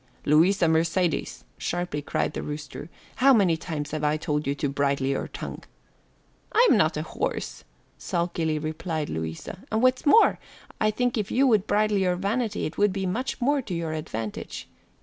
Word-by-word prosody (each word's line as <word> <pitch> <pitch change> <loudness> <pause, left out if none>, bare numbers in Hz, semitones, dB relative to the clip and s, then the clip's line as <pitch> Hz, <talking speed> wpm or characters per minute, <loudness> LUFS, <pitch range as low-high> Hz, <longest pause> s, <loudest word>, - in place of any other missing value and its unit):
"Louisa 170 +5 +4
Mercedes," 165 +2 0
sharply 175 -4 -2
cried - - -1
the - - -4
rooster, 150 +2 -7 0.3
"how 275 +2 +6
many 190 -6 +4
times 150 -2 -5
have 155 0 -3
I 150 +1 +2
told 150 -2 -2
you 140 - 0
to 145 - -1
bridle 140 0 0
your 135 0 -1
tongue?" - - -7 0.9
"I'm 470 +3 +5
not - - +2
a - - -2
horse," - - -4 0.4
sulkily 170 -3 -1
replied 155 0 -3
Louisa, 80 - -5
"and 220 +2 +1
what's 255 +2 +3
more, 445 +10 +6 0.4
I 215 - +3
think 245 +2 0
if 205 - -2
you 270 +2 +3
would 220 -6 +3
bridle 210 -1 +2
your 180 -2 +2
vanity 210 +5 -1
it - - -5
would 205 -1 +4
be 190 -1 -2
much 235 +11 -2
more 280 +3 +2
to 200 -8 -5
your 165 -1 -2
advantage. 115 -9 -5
170 Hz, 170 wpm, -26 LUFS, 150-215 Hz, 0.9 s, how